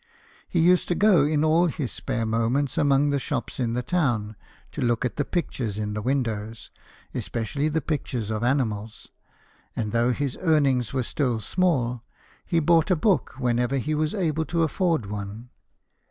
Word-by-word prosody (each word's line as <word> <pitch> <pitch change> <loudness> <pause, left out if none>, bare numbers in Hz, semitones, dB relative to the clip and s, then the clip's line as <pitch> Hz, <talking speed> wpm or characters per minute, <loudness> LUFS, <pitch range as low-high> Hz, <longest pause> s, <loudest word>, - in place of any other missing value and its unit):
He 175 - 0
used 180 +2 +4
to 175 - 0
go 200 -7 +5
in 150 0 +1
all 165 +3 +4
his 145 -5 -3
spare 120 -4 -3
moments 115 +5 0
among 145 0 +3
the 140 - +1
shops 135 -2 -4
in 120 -2 0
the 125 +1 -1
town, 120 -10 0 0.4
to 150 - -6
look 120 0 +1
at 125 - -2
the 145 - 0
pictures 125 - -3
in 105 -1 -3
the 105 - -3
windows, 115 -4 -2 0.4
especially 140 +6 -2
the 160 +1 0
pictures 125 -8 -3
of 110 +1 -2
animals; 115 -5 -1 0.7
and 105 -2 -2
though 120 +2 +2
his 135 +1 -2
earnings 140 - +2
were 130 -2 -1
still 125 -2 -1
small, 125 - 0 0.4
he 170 -3 +1
bought 165 +1 +3
a 185 - +4
book 185 +4 +1
whenever 125 +1 +1
he 150 +4 -1
was 155 +4 0
able 160 -5 0
to 165 +2 0
afford 165 - 0
one. 105 +4 -7
135 Hz, 170 wpm, -25 LUFS, 115-155 Hz, 0.7 s, go